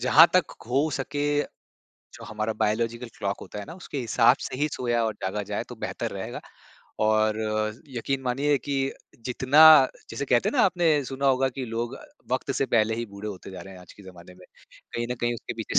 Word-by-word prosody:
जहाँ - - +7
तक - - +3 0.2
हो 135 +5 +2
सके, 145 +2 -1 0.7
जो - - -10
हमारा 110 +1 -3
बायोलॉजिकल 115 +3 0
क्लॉक 100 -1 -2
होता - - -8
है 105 - -5
ना 160 - -9
उसके 170 -5 -7
हिसाब 115 -1 +4
से - - -5
ही 150 +3 +1
सोया 120 -2 0
और 110 -1 -1
जागा 95 +2 -2
जाए 100 +1 -4
तो - - -8
बेहतर - - -4
रहेगा। - - -6 0.6
और 110 0 +2 0.5
यकीन 135 +2 -2
मानिए 140 +3 +1
कि 140 +3 -4 0.5
जितना 130 +4 +3 0.5
जैसे - - -3
कहते 120 -2 +3
हैं - - -2
ना 250 - +5
आपने 165 -6 +2
सुना 135 +1 -3
होगा 135 0 +3
कि 130 0 -5
लोग 115 +2 -3 0.4
वक़्त 130 +1 -1
से 135 - +1
पहले 110 -2 +2
ही 120 - -3
बूढ़े 100 0 -8
होते 95 -1 -8
जा 95 -2 -8
रहे 95 - -11
हैं 90 - -12
आज 90 - -14
के 105 - -16
ज़माने 90 -1 -13
में, 90 0 -17 0.5
कहीं 120 0 -1
न - - -3
कहीं 120 0 0
उसके 115 - -6
पीछे - - 0
120 Hz, 205 wpm, -26 LUFS, 110-135 Hz, 0.7 s, जहाँ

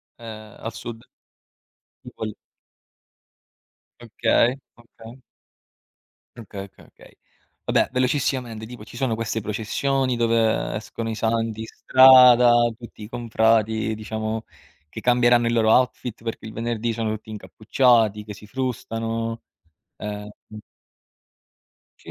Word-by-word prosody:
Ehm, 110 -2 -11
al 115 0 -6
Sud? 115 0 -8 1.0
Tipo 110 - -8
il 105 - -6 1.7
Okay, 120 +1 +1 0.2
okay. 115 +1 -14 1.2
Okay, 100 -3 -8
okay, 100 - -17
okay. - - -20 0.5
Vabbè, - - +1
velocissimamente, 125 -3 -1
tipo 120 -3 -10
ci 120 - -13
sono 125 -2 0
queste 110 0 -3
processioni 125 +5 -1
dove 115 -1 +1
escono 115 +1 -5
i - - -3
santi 115 0 -1
in 110 - -5
strada, 125 -2 +7 0.3
tutti 120 -3 -12
i 105 - -8
confrati, 110 -2 +1
diciamo, 110 +1 -4 0.4
che 110 - -8
cambieranno 120 -1 +3
il - - -1
loro 110 -1 +3
outfit 125 -2 +1
perché 115 -1 -6
il 110 - -8
venerdì 115 0 -2
sono 110 -1 -2
tutti 110 0 -8
incappucciati, 110 0 +1
che 105 -1 -8
si 105 +1 -14
frustano. 115 -2 -4 0.5
Ehm 105 0 -6 1.7
Sì - - -18
115 Hz, 115 wpm, -23 LUFS, 110-120 Hz, 1.7 s, strada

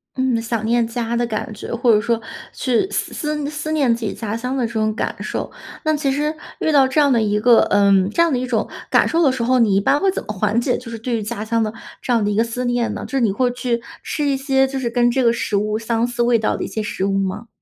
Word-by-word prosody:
嗯， 260 -3 +1
想 225 -1 -2
念 235 +1 +2
家 230 0 -3
的 240 0 0
感 220 +1 -4
觉， 205 - -8
或 240 0 +3
者 210 - +4
说 230 0 0 0.3
去 255 +9 0
思 - - -3
思 300 -2 -2
思 305 +1 -4
念 280 -6 +2
自 235 - -8
己 210 - -2
家 215 0 -4
乡 250 +3 -3
的 250 - +1
这 230 - -6
种 215 -1 0
感 - - -2
受。 - - -4 0.3
那 310 -1 +2
其 290 -2 0
实 300 +3 -1 0.2
遇 315 - +1
到 275 -3 +5
这 260 +4 +1
样 285 -2 +4
的 230 - +3
一 210 -1 +1
个， 235 +1 +6
嗯， 200 -2 +4
这 275 - +1
样 335 - +1
的 - - +2
一 255 - -3
种 225 -3 0 0.2
感 - - +4
受 335 - +1
的 285 -5 +4
时 255 -2 -2
候， 255 +2 +3
你 215 -5 +3
一 - - +4
般 280 +8 +2
会 390 - +2
怎 - - -4
么 210 - -4
缓 210 +3 +1
解 245 +1 0
就 250 - -10
是 230 - -6
对 235 +2 -2
于 - - -3
家 210 0 -4
乡 230 +1 0
的 215 -1 -1 0.3
这 - - -3
样 230 -3 +3
的 205 - 0
一 - - -1
个 225 - +3
思 235 +2 -4
念 245 -1 0
呢？ - - -5
就 - - -11
是 270 - +1
你 225 -5 +2
会 250 +5 +1
去 245 -1 -2 0.2
吃 300 - -2
一 280 -1 +2
些 270 0 +2
就 265 0 -4
是 245 -2 -1
跟 240 0 +2
这 260 +2 +1
个 235 - +5
食 230 -2 -2
物 210 +1 0
相 230 +1 0
似 240 0 -1
味 235 -1 +3
道 215 - 0
的 - - -4
一 - - -3
些 220 - -4
食 200 -2 -3
物 195 0 0
吗？ 195 +4 -3
235 Hz, 315 characters per minute, -20 LUFS, 220-260 Hz, 0.3 s, 个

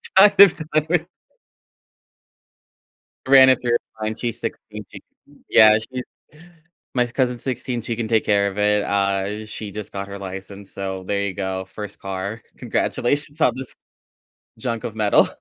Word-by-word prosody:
kind 195 +1 +6
of 200 -4 +10
done 155 -1 -1
with 170 0 +1 2.2
Ran 130 -1 +8
it 130 - +4
through 120 -1 -1
her - - +5 0.2
mind. 110 +1 -3
She's 120 -2 -3
16. - - -6
She - - -11 0.5
yeah, 110 -1 +7
she 125 +4 -6 0.9
my 125 -1 +3
cousin's 125 -1 -1
16, 125 -1 -3
she 115 +1 -3
can 115 0 -3
take 110 -1 +1
care 100 -1 +3
of 95 - -10
it. 105 0 +2
Uh, 100 +1 -1
she 110 -1 -7
just 105 0 -7
got 100 0 -5
her 100 0 -7
license, 95 +1 -8
so 95 -1 -5
there 100 -1 0
you 100 -1 -2
go, 95 -1 -3
first 105 +1 -9
car. 95 +3 -5 0.2
Congratulations 145 +4 -1
on 125 - +4
this 130 -1 -7 0.8
junk 115 -1 -3
of 110 - -5
metal. 105 -2 +4
110 Hz, 160 wpm, -22 LUFS, 100-125 Hz, 2.2 s, of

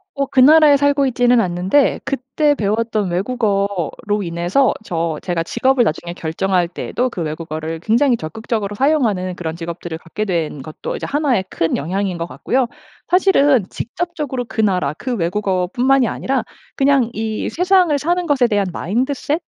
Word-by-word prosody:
어 275 - 0
그 260 -1 +2
나라에 300 +1 +7
살고 285 0 +2
있지는 245 -1 +3
않는데 185 +8 +1
그때 275 +2 0
배웠던 215 -2 -1
외국어로 200 -1 -1
인해서 175 +10 +1
저 165 -4 -2
제가 175 -2 -1
직업을 260 +6 +2
나중에 170 0 -3
결정할 175 +2 0
때에도 250 +8 -2
그 180 - -6
외국어를 160 +1 -4
굉장히 235 - +2
적극적으로 205 +4 -4
사용하는 220 - +1
그런 160 -2 -4
직업들을 170 -1 -6
갖게 195 +6 -4
된 165 -7 -2
것도 155 +1 -6
이제 - - -5
하나의 275 -9 +1
큰 165 - -1
영향인 185 +4 -2
것 170 - -3
같고요. 255 +5 -1 0.4
사실은 290 - +4
직접적으로 295 -2 -4
그 220 - -7
나라 185 -9 +2
그 255 - -3
외국어뿐만이 210 +8 +1
아니라 265 -2 -1 0.3
그냥 270 -3 +3
이 220 -1 -3
세상을 360 -3 +3
사는 345 +4 -1
것에 270 -4 +3
대한 205 -3 +1
마인드셋이 265 - -1
220 Hz, 365 characters per minute, -19 LUFS, 175-270 Hz, 0.4 s, 나라에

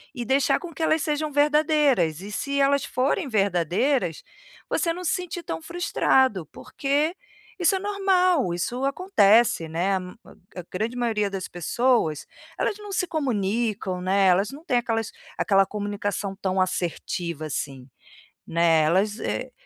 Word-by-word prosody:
e 245 - -3
deixar 265 +3 +2
com 350 - -8
que 320 - -4
elas 315 0 +2
sejam 300 0 -1
verdadeiras, 290 - +2
e 205 +2 -8
se 280 +5 -2
elas 280 0 +2
forem 275 +6 0
verdadeiras, 195 - +1 0.5
você 335 -2 0
não 360 - -7
se 320 - +1
sentir 360 -1 -4
tão - - -4
frustrado, 265 - +1
porque 290 +5 -1 0.4
isso 355 +2 +3
é 380 - -1
normal, 370 - +2
isso 245 +10 -2
acontece, 235 - +3
né, 175 +5 0
a 190 - 0
m 180 0 -9
a 180 0 -14
a - - -16
grande 220 +6 -2
maioria 220 -4 0
das 190 -1 -4
pessoas, 175 - 0 0.3
elas 415 - 0
não 415 -1 -9
se 370 -2 0
comunicam, 215 - -1
né, 190 +1 +3
elas 190 +3 +3
não 290 +4 -11
têm 250 -8 +1
aquelas 225 -2 -2 0.3
aquela 195 -2 +3
comunicação 205 -1 -3
tão 190 -1 0
assertiva, 170 -3 -3
assim, 135 -3 -5 0.6
né. 165 -1 +3
Elas, 195 +7 +1
eh - - -3
225 Hz, 155 wpm, -24 LUFS, 185-295 Hz, 0.6 s, isso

